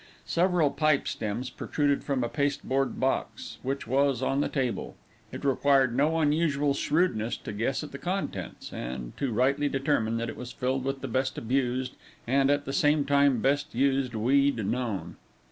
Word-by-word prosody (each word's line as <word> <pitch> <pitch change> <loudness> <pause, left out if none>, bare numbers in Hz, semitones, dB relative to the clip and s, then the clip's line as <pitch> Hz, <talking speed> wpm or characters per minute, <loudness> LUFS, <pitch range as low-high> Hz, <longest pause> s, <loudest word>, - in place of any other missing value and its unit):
Several 175 -4 +2
pipe 155 -1 +2
stems 115 +4 -3
protruded 145 -2 0
from 135 -3 -1
a - - 0
pasteboard 135 -1 -1
box, 250 - -2
which 135 +2 -3
was 135 0 +1
on 135 +2 +1
the - - 0
table. 130 -4 -2 0.4
It - - -7
required 135 -2 +3
no 150 +5 +2
unusual 150 -2 +2
shrewdness 140 -7 0
to - - -7
guess 120 +8 -1
at 150 - -8
the 140 - -7
contents, 190 +2 -4
and 60 0 -6
to 135 -3 -1
rightly 135 +5 +2
determine 135 -5 0
that 115 0 -2
it - - -6
was 125 0 -7
filled 130 +1 -2
with 135 0 -2
the - - -4
best 130 0 -1
abused, 125 +1 -1 0.3
and, 135 +2 +3
at 145 0 +1
the 135 - -4
same 150 -3 +3
time, 140 -4 +3
best 145 +2 0
used 135 -1 +1
weed 130 0 +2
known. 115 -2 -3
135 Hz, 170 wpm, -28 LUFS, 125-145 Hz, 0.4 s, required